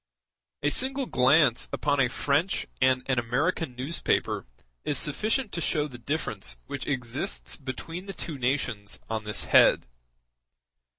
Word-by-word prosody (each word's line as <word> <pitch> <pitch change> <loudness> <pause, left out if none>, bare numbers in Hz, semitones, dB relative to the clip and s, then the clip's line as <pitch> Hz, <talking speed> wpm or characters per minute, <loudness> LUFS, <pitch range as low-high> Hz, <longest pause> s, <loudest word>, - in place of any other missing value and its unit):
A 145 - +2
single 270 - +2
glance 130 - +3
upon 145 -1 0
a 125 -2 +4
French 145 +9 0 0.2
and 130 0 +3
an 130 -2 +1
American 130 +4 -1
newspaper 130 - -1 0.4
is 145 - 0
sufficient 215 - 0
to 170 - -3
show 150 -1 0
the 125 -4 -11
difference 120 - -1
which - - -6
exists 130 +6 -2
between 165 +7 -6
the 195 - -5
two 150 -5 -5
nations 120 -7 -1
on 110 -1 -2
this 105 - 0
head. - - +5
140 Hz, 135 wpm, -27 LUFS, 125-165 Hz, 0.4 s, head